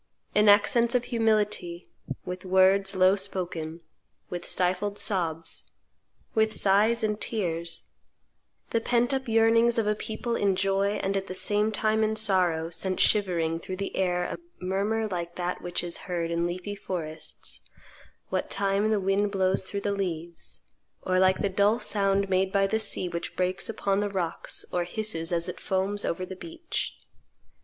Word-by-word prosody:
"In 210 0 +5
accents 235 +4 +5
of 245 - +3
humility, 210 -7 0 0.3
with 180 0 -5
words 190 +1 +4
low 185 +1 +5
spoken, 175 -4 -4 0.5
with 175 -1 -5
stifled 185 +3 0
sobs, 165 -6 -1 0.6
with 220 -1 +2
sighs 210 +4 +3
and 210 -1 -1
tears, 170 -6 -3 0.8
the 230 - +1
pent 245 +2 +2
up 265 -1 -2
yearnings 230 +1 +4
of 225 - +2
a 210 - +2
people 220 +2 -3
in 200 -3 +2
joy 195 +1 +1
and 195 +1 0
at 195 0 -2
the 185 - -5
same 210 +3 +2
time 220 +1 +1
in 215 0 +1
sorrow 180 -6 +2
sent 185 +2 -2
shivering 170 -6 +2
through 185 +2 -6
the 195 +1 -4
air 180 -2 +1
a - - -4 0.2
murmur 200 +4 0
like 175 -3 -4
that 180 0 -3
which 175 0 -2
is 175 -1 -3
heard 170 -2 -1
in 170 +1 +1
leafy 180 +3 -4
forests 160 -6 -5 0.7
what - - -1
time 200 +1 +1
the 215 -1 +2
wind 195 +2 +1
blows 190 -1 +1
through 200 +1 -4
the 205 - -1
leaves, 170 -4 -4 0.4
or 185 0 +1
like 190 0 +4
the - - +3
dull 200 +3 +3
sound 200 -4 +1
made 190 0 +1
by 195 0 +3
the 220 +3 0
sea 205 -4 0
which 170 -1 -5
breaks 185 +3 -1
upon 200 -3 0
the 205 0 0
rocks, 180 -4 -3
or 175 - +1
hisses 175 -3 -2
as 170 0 0
it 180 - -6
foams 195 +2 -1
over 185 +2 -2
the 190 - -8
beach." 330 - -5
195 Hz, 165 wpm, -27 LUFS, 180-210 Hz, 0.8 s, In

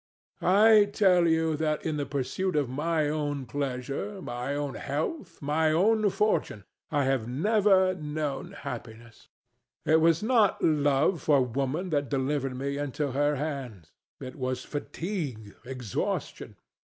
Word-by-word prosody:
I 210 +2 +6
tell 190 -4 +3
you 160 -1 +2
that 155 -1 -1
in 155 -2 -1
the 145 - -2
pursuit 145 +7 -2
of 145 -3 +1
my 155 +4 0
own 145 -2 -2
pleasure, 140 - -4
my 125 -3 -4
own 145 -1 -3
health, 165 - -4
my 155 +2 +2
own 210 +6 +3
fortune, 195 - 0 0.3
I 145 -2 +1
have 130 -4 0
never 190 - +3
known 150 -4 -4
happiness. 115 +1 -9 0.6
It 160 +1 +4
was 165 +2 +3
not 220 -3 +3
love 145 +1 +2
for 140 -3 +4
Woman 140 +9 -2
that 145 -3 0
delivered 135 0 -1
me 140 +2 -3
into 145 0 -2
her 145 +2 +1
hands: 135 - -5 0.3
it 130 +1 -8
was 130 -1 -3
fatigue, 145 - -5
exhaustion. 125 -5 -4
145 Hz, 135 wpm, -28 LUFS, 135-170 Hz, 0.6 s, I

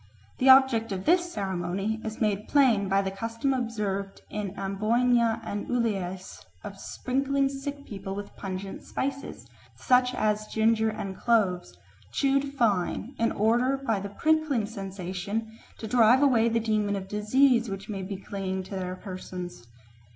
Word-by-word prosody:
The 265 - +4
object 260 -4 +6
of 190 -1 -4
this 350 0 +3
ceremony 195 - -2
is 220 0 -5
made 210 -2 0
plain 235 -9 +3
by 195 +1 +3
the 190 - -2
custom 230 +7 -2
observed 210 -6 -3
in 205 -2 -4
Amboyna 225 +4 +1
and 205 - -4
Uliase 195 -6 -2 0.2
of - - -8
sprinkling 275 +1 0
sick 280 +1 -6
people 195 -1 -6
with 205 0 -7
pungent 195 0 -6
spices, 275 +1 -4 0.3
such 250 0 +3
as 215 -2 0
ginger 220 0 +2
and 200 -3 -5
cloves, 195 -7 +1 0.3
chewed 275 0 +1
fine, 215 +1 0
in 230 - +2
order 240 +6 +2
by 230 -7 -1
the 200 +1 -5
prickling 305 -1 +1
sensation 200 +2 -5 0.2
to - - -7
drive 240 +4 +5
away 235 -5 +4
the 230 0 +1
demon 215 -2 0
of 190 -1 -5
disease 235 +4 +3
which 195 0 -6
may 200 -3 -4
be 190 +1 -5
clinging 190 -1 -4
to 185 - -14
their 185 -1 -3
persons. 180 - -8
215 Hz, 150 wpm, -27 LUFS, 195-250 Hz, 0.3 s, object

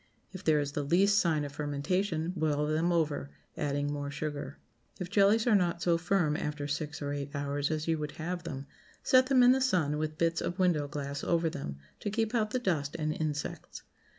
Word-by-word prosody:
If 185 0 -9
there 155 -4 +4
is 145 -1 -2
the 145 - -2
least 195 +7 +4
sign 155 -4 +1
of 145 - -6
fermentation, 160 +4 -1
boil 150 -3 +1
them 160 +3 +1
over, 155 -4 0 0.3
adding 145 0 -1
more 145 -1 -3
sugar. 145 0 -5 0.4
If 180 0 -5
jellies 205 +2 +4
are 240 - +4
not 175 -3 +2
so 170 -1 +3
firm 175 -3 +1
after 150 -1 -3
six 150 +1 -3
or 145 0 -2
eight 145 0 -5
hours 145 0 -1
as 155 0 -2
you 165 -1 +1
would 150 -1 -4
have 175 +2 -4
them, 140 -5 -6 0.4
set 255 0 +5
them 260 -2 +5
in 245 - +8
the 265 +1 +3
sun, 165 - +1
with 155 0 -3
bits 165 0 +1
of 175 - -3
window 175 -6 +2
glass 140 -1 -5
over 165 -1 +1
them 105 - -5 0.2
to - - -3
keep 220 +2 -1
out 220 -3 +1
the 255 - -1
dust 160 - -1
and 155 -1 -1
insects. 150 -2 -4
155 Hz, 205 wpm, -30 LUFS, 145-180 Hz, 0.4 s, in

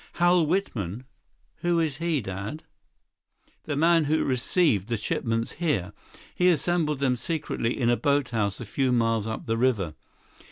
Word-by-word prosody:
"Hal 175 -2 +3
Whitman? 125 - -2 0.5
Who 175 -1 +1
is 155 -4 0
he, 165 -3 0
Dad?" 100 +10 -6 1.0
"The 150 - -2
man 165 +1 +4
who 155 +2 +1
received 130 - +1
the 115 - 0
shipments 115 +2 -2
here. 145 - -1 0.4
He 180 0 +3
assembled 165 -2 +1
them 130 -2 +1
secretly 135 -4 -2
in 120 - +1
a - - +4
boathouse 125 -8 0
a 120 - -6
few 130 +4 0
miles 115 -3 +1
up 110 - -5
the 115 0 -1
river. 115 -10 +1
130 Hz, 150 wpm, -26 LUFS, 115-160 Hz, 1.0 s, man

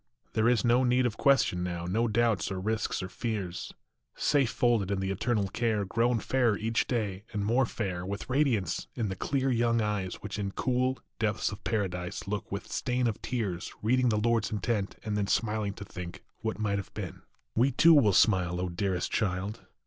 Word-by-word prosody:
There 110 +1 +3
is 120 -3 +2
no 120 +2 +4
need 125 0 +3
of 120 - 0
question 135 -10 +3
now, 85 -1 -3
No 110 +7 +1
doubts 115 -3 +1
or 95 - -2
risks 110 -1 -1
or - - -3
fears: 95 -5 -4 0.4
Safe 140 -5 +2
folded 120 -6 +2
in 100 -1 0
the 95 0 -1
Eternal 105 +1 0
care, 110 -1 0
Grown 115 +4 +2
fairer 120 -1 +1
each 115 +2 0
day 105 -5 -2
and 105 -2 -1
more 120 +3 +3
fair, 95 -7 -3
With 100 +2 -5
radiance 125 - +1
in 110 -4 -1
the 95 - -3
clear 135 +6 0
young 115 -1 +2
eyes 105 -4 -1
Which 105 +1 -6
in 100 -1 -2
cool, 130 +1 0 0.2
depths 105 -3 0
of 100 0 -9
Paradise 95 -5 -2
Look 105 0 -3
without 100 +2 -5
stain 125 -1 0
of 115 -3 -1
tears, 105 -9 -3
Reading 125 +3 +3
the 105 - +2
Lord 115 0 +2
s - - -5
intent, 105 -1 -1
and 105 -1 -1
then 100 -1 0
Smiling 105 -1 0
to 100 - -8
think 90 -2 -8 0.2
what 110 -1 -3
might 100 -2 0
have 95 - -8
been. - - -6 0.3
We 125 +4 +4
too 165 +6 +6
will 130 -9 +6
smile, 90 -4 +3
O 90 0 -1
dearest 90 0 -1
child 100 0 -1
105 Hz, 195 wpm, -29 LUFS, 95-120 Hz, 0.4 s, too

